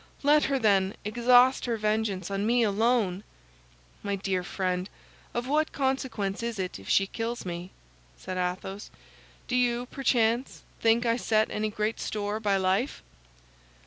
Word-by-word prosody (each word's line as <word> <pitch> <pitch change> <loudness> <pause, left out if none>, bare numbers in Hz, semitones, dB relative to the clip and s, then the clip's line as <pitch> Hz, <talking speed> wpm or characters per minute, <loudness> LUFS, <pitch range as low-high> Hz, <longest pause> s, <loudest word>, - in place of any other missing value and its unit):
Let 295 +1 +5
her, 275 - +1
then, 200 -5 +2
exhaust 245 +4 +4
her 235 -2 -1
vengeance 210 -3 -1
on 195 0 -1
me 235 +2 +3
alone!" 210 -2 +1 0.8
"My 200 -1 -2
dear 190 -2 -2
friend, 185 0 -2 0.4
of 240 +1 -3
what 305 +3 +1
consequence 260 -8 -1
is 235 -1 -3
it 185 - -4
if 95 - -11
she 195 - +4
kills 230 +3 -4
me?" 175 0 -5 0.5
said 185 - -6
Athos. 185 +3 -3 0.6
"Do 250 - -1
you, 245 -1 +1
perchance, 245 -2 0 0.2
think 230 +1 +3
I 230 0 +2
set 220 -3 +1
any 215 0 -1
great 215 +1 -2
store 210 0 -3
by 205 -3 +1
life?" 190 +8 0
215 Hz, 145 wpm, -28 LUFS, 195-240 Hz, 0.8 s, Let